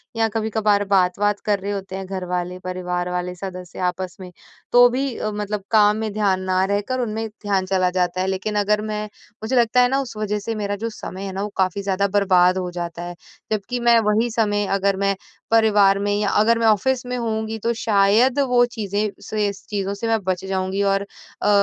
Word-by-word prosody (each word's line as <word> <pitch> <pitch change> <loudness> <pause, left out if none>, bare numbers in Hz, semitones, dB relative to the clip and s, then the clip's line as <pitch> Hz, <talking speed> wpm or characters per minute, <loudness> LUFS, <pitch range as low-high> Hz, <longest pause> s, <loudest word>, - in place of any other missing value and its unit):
या 225 0 +2
कभी-कभार 215 -2 +1
बात-वात 195 +2 +2
कर 205 -2 +1
रहे 200 +2 -4
होते 195 -1 -5
हैं 190 0 -5
घर 185 -1 -5
वाले, 180 0 -3
परिवार 180 -1 -3
वाले 180 0 -3
सदस्य 180 -1 -8
आपस 180 0 -4
में 180 -1 -9 0.4
तो 245 0 +8
भी 260 0 -2
अ, 215 - -2
मतलब 210 -1 -3
काम 210 -1 +5
में 220 -1 -2
ध्यान 195 -3 +1
ना 185 0 +3
रहकर 205 +6 -1
उनमें 225 -1 -2
ध्यान 205 -3 -2
चला 185 -1 +1
जाता 180 0 0
है। 190 - -1
लेकिन 195 +3 -2
अगर 210 +1 +2
मैं 210 0 -2 0.4
मुझे 250 +4 -1
लगता 240 +1 +4
है 245 - +5
न 270 - 0
उस 240 -5 -7
वज़ह 210 -1 -1
से 225 +2 -4
मेरा 205 -1 -2
जो - - -1
समय 195 -2 -8
है 190 - -4
ना, 195 - -3
वो 210 - -3
काफ़ी 190 +1 +1
ज़्यादा 200 0 0
बर्बाद 185 -2 +3
हो 180 -1 -2
जाता 175 -1 -5
है। 175 0 -6 0.4
जबकि 225 +4 -2
मैं 235 -1 +5
वही 225 +3 +2
समय 205 -2 +1
अगर 195 0 +1
मैं 195 0 +1 0.4
परिवार 205 -3 +4
में 205 0 0
या 205 -2 +1
अगर 230 +2 +3
मैं 225 - +3
ऑफ़िस 245 +4 +2
में 250 0 -3
होऊँगी 220 -1 -2
तो 235 +3 0
शायद 220 +6 +3
वो 245 -1 +4
चीज़ें 210 -1 -2
से 210 -1 -1
इस 195 - -9
चीज़ों 200 -1 -2
से 225 +3 -4
मैं 225 -1 +2
बच 185 0 -2
जाऊँगी। 190 +1 -1
और 195 0 +2 0.4
अ, - - 0
205 Hz, 215 wpm, -22 LUFS, 190-220 Hz, 0.4 s, तो